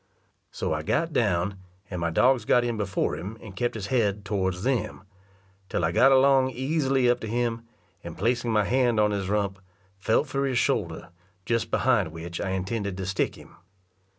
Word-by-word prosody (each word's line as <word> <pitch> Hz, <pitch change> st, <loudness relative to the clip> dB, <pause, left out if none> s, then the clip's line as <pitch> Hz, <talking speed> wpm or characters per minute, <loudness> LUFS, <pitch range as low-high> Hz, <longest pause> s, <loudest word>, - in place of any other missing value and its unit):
So -, -, -3 dB
I 75 Hz, -, -2 dB
got 165 Hz, -, -1 dB
down, 95 Hz, -3 st, 0 dB, 0.3 s
and 90 Hz, -2 st, -4 dB
my 85 Hz, -, 0 dB
dogs 125 Hz, +8 st, +3 dB
got 120 Hz, +3 st, +3 dB
in 120 Hz, -1 st, -1 dB
before 100 Hz, -3 st, -1 dB
him 105 Hz, +5 st, -7 dB
and 100 Hz, -4 st, -11 dB
kept 120 Hz, +4 st, -1 dB
his 105 Hz, -3 st, -4 dB
head 105 Hz, -4 st, +1 dB
towards 95 Hz, -3 st, -1 dB
them, 125 Hz, -6 st, -1 dB, 0.7 s
till 85 Hz, -, 0 dB
I 80 Hz, -, 0 dB
got 135 Hz, +9 st, +5 dB
along 135 Hz, 0 st, +5 dB
easily 135 Hz, 0 st, +1 dB
up 120 Hz, 0 st, +3 dB
to 110 Hz, -, -6 dB
him; 115 Hz, 0 st, -2 dB, 0.4 s
and -, -, -8 dB
placing 120 Hz, +2 st, 0 dB
my 105 Hz, -1 st, +3 dB
hand 120 Hz, 0 st, +2 dB
on 105 Hz, 0 st, +3 dB
his 100 Hz, -2 st, -2 dB
rump, 100 Hz, -2 st, -1 dB, 0.4 s
felt 110 Hz, +8 st, +2 dB
for 135 Hz, +1 st, -1 dB
his 130 Hz, -2 st, 0 dB
shoulder, 110 Hz, -, -1 dB, 0.4 s
just 115 Hz, 0 st, 0 dB
behind 115 Hz, -10 st, +2 dB
which 85 Hz, +1 st, -6 dB
I 95 Hz, -, -2 dB
intended 95 Hz, +1 st, -3 dB
to 95 Hz, -, -4 dB
stick 95 Hz, 0 st, -1 dB
him. -, -, -16 dB
110 Hz, 185 wpm, -26 LUFS, 95-125 Hz, 0.7 s, got